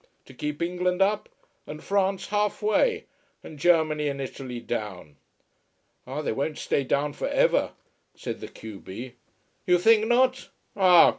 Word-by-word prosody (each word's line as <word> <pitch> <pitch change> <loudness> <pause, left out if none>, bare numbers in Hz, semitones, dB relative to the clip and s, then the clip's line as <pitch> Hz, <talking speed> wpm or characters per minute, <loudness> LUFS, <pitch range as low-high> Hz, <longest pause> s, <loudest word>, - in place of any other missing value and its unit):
To - - -14
keep 150 +4 -3
England 180 +1 -1
up, 200 +2 +1 0.4
and 150 +1 -8
France 195 -1 0
half 210 0 0
way, 435 - +2 0.4
and 150 - -10
Germany 155 -2 +3
and 140 -1 -3
Italy 130 -2 -6
down." 100 -11 -5 0.9
"Ah, 140 +4 -4
they - - -1
won't 140 +6 -2
stay 140 - 0
down 145 +2 0
for - - -3
ever," - - +2 0.4
said - - -5
the - - -7
q 110 -3 -10
b. 120 +6 -8 0.5
"You 180 0 +5
think 220 +4 +4
not? 255 +2 +2 0.3
Ah! 180 -4 +7
160 Hz, 150 wpm, -26 LUFS, 135-200 Hz, 0.9 s, Ah